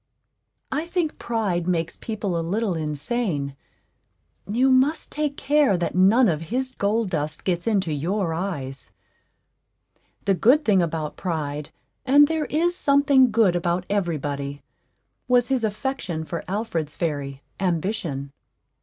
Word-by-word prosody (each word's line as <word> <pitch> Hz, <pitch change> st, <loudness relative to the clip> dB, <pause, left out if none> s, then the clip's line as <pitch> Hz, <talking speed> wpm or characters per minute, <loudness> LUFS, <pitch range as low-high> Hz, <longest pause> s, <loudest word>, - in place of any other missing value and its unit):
I 315 Hz, +3 st, -2 dB
think 345 Hz, -3 st, -1 dB
Pride 200 Hz, -7 st, -1 dB
makes 170 Hz, -2 st, 0 dB
people 205 Hz, -5 st, -3 dB
a 165 Hz, -, 0 dB
little 200 Hz, +4 st, -1 dB
insane; 150 Hz, -, -2 dB, 1.0 s
you 255 Hz, +4 st, +3 dB
must 270 Hz, +5 st, +2 dB
take 295 Hz, -1 st, -2 dB
care 285 Hz, -9 st, +3 dB
that 175 Hz, -, -2 dB
none 205 Hz, +7 st, +5 dB
of 160 Hz, -4 st, 0 dB
his 260 Hz, +2 st, -1 dB
gold 210 Hz, -2 st, 0 dB
dust 155 Hz, -2 st, -3 dB
gets 175 Hz, +1 st, -1 dB
into 190 Hz, -7 st, +1 dB
your 170 Hz, +4 st, -1 dB
eyes. 155 Hz, -7 st, -4 dB, 1.3 s
The 195 Hz, -, +3 dB
good 255 Hz, -, +4 dB
thing 195 Hz, -4 st, +4 dB
about 160 Hz, -3 st, -3 dB
Pride 150 Hz, -4 st, -3 dB, 0.3 s
and 285 Hz, +2 st, +6 dB
there 320 Hz, -1 st, -1 dB
is 340 Hz, +4 st, +1 dB
something 280 Hz, -4 st, +4 dB
good 215 Hz, -5 st, +3 dB
about 175 Hz, +1 st, 0 dB
every 175 Hz, -6 st, 0 dB
body 140 Hz, 0 st, -5 dB, 0.6 s
was 245 Hz, 0 st, +3 dB
his 260 Hz, -3 st, +1 dB
affection 210 Hz, -, -2 dB
for 170 Hz, +1 st, -5 dB
Alfred's 180 Hz, -7 st, -3 dB
fairy, 140 Hz, -4 st, -3 dB, 0.2 s
Ambition. 170 Hz, -6 st, -2 dB
190 Hz, 135 wpm, -24 LUFS, 160-250 Hz, 1.3 s, and